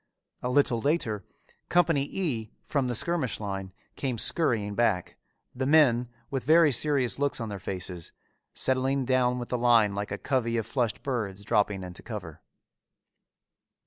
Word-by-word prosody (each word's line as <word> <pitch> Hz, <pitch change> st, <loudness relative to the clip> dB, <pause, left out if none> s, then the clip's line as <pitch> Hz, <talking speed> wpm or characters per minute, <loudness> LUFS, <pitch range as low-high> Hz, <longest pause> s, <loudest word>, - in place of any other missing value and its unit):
A 125 Hz, -, -2 dB
little 125 Hz, -3 st, +2 dB
later 120 Hz, -8 st, 0 dB, 0.5 s
Company 165 Hz, -5 st, +3 dB
E, 125 Hz, -, -2 dB, 0.2 s
from 140 Hz, -4 st, 0 dB
the 120 Hz, -, -1 dB
skirmish 160 Hz, -1 st, -1 dB
line, 95 Hz, -2 st, -5 dB, 0.2 s
came 130 Hz, -4 st, -2 dB
scurrying 110 Hz, -7 st, +2 dB
back, 100 Hz, -5 st, 0 dB, 0.4 s
the 130 Hz, +1 st, -2 dB
men, 125 Hz, -6 st, +4 dB, 0.2 s
with 135 Hz, -2 st, -2 dB
very 160 Hz, +1 st, +5 dB
serious 135 Hz, -1 st, 0 dB
looks 145 Hz, -2 st, 0 dB
on 115 Hz, -2 st, -4 dB
their 100 Hz, -1 st, -5 dB
faces, 90 Hz, -2 st, -4 dB, 0.4 s
settling 130 Hz, +1 st, +2 dB
down 125 Hz, -1 st, +2 dB
with 120 Hz, -1 st, -5 dB
the 125 Hz, -, -1 dB
line 115 Hz, -4 st, +4 dB
like 100 Hz, +1 st, -4 dB
a -, -, -2 dB
covey 115 Hz, -4 st, 0 dB
of 115 Hz, -, -1 dB
flushed 115 Hz, -1 st, -2 dB
birds 105 Hz, -7 st, -3 dB
dropping 100 Hz, -1 st, +1 dB
into 90 Hz, -1 st, -8 dB
cover. -, -, -8 dB
125 Hz, 150 wpm, -28 LUFS, 105-140 Hz, 0.5 s, very